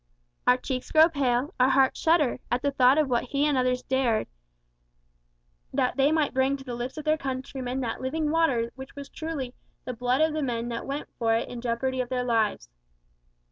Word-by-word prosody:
Our 250 0 +6
cheeks 255 0 -4
grow 315 +2 +7
pale, 275 0 0
our 255 +1 +5
hearts 265 0 +3
shudder, 315 -6 +2
at 245 +2 -1
the 285 - +1
thought 260 0 +4
of 305 -2 +3
what 245 -2 0
he 280 +3 0
and 295 -2 +2
others 255 -1 +1
dared, 255 -4 +1 1.5
that 250 - 0
they 275 +2 +3
might 315 -2 +1
bring 265 +1 +2
to 270 - -11
the 250 -2 -6
lips 240 +4 -5
of 310 - -6
their 310 0 +2
countrymen 260 -1 -4
that 230 -3 -3
living 300 +3 -1
water 265 -8 +1
which 265 0 -11
was 280 -1 -8
truly 295 -6 -5 0.3
"the 250 - -4
blood 250 +4 0
of 315 0 +3
the 310 - -1
men 240 -3 -2
that 230 -1 -5
went 280 +2 -4
for 225 -1 +2
it 230 - -1
in 245 -1 -7
jeopardy 255 +2 -1
of 245 - -5
their 250 -1 -1
lives." 225 - 0
260 Hz, 205 wpm, -26 LUFS, 245-285 Hz, 1.5 s, grow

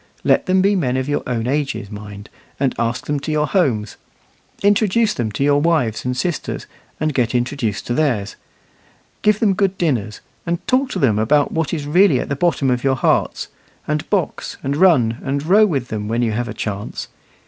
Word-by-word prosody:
Let - - +2
them 185 0 +3
be 200 +1 +3
men 130 -8 0
of 130 0 -2
your 145 - 0
own 115 -2 -1
ages, 135 -6 -2
mind, 105 0 -9 0.3
and 135 -2 +1
ask 115 +1 -1
them 145 -1 -1
to 145 +3 -4
your 150 0 +1
homes; 125 - 0 0.7
introduce 210 +2 +3
them 110 -3 -2
to 135 - -1
your 145 0 +3
wives 150 -9 +1
and 125 0 -2
sisters, 175 -1 -3 0.3
and 155 0 0
get 125 -2 0
introduced 120 -5 -1
to 120 - -2
theirs; 120 -9 0 0.9
give 210 -1 +3
them 210 -4 +3
good 195 -1 0
dinners, 115 - -1 0.2
and 170 +1 -3
talk 260 +1 +2
to - - -2
them 120 - +2
about 145 +7 +2
what 160 -2 -1
is 150 -4 -3
really 165 -2 +4
at - - -4
the 140 - -1
bottom 140 -4 +1
of 125 -1 -1
your 135 -1 +2
hearts; - - 0 0.4
and 150 +1 -2
box, 195 -6 -2
and 140 +1 -1
run, 140 -9 +3
and 140 +1 -2
row 210 +5 +5
with 135 - -2
them, 105 -1 -4
when 115 +2 0
you 115 - +1
have 120 +3 -2
a 110 - -5
chance. 105 -2 -5
140 Hz, 200 wpm, -19 LUFS, 120-170 Hz, 0.9 s, row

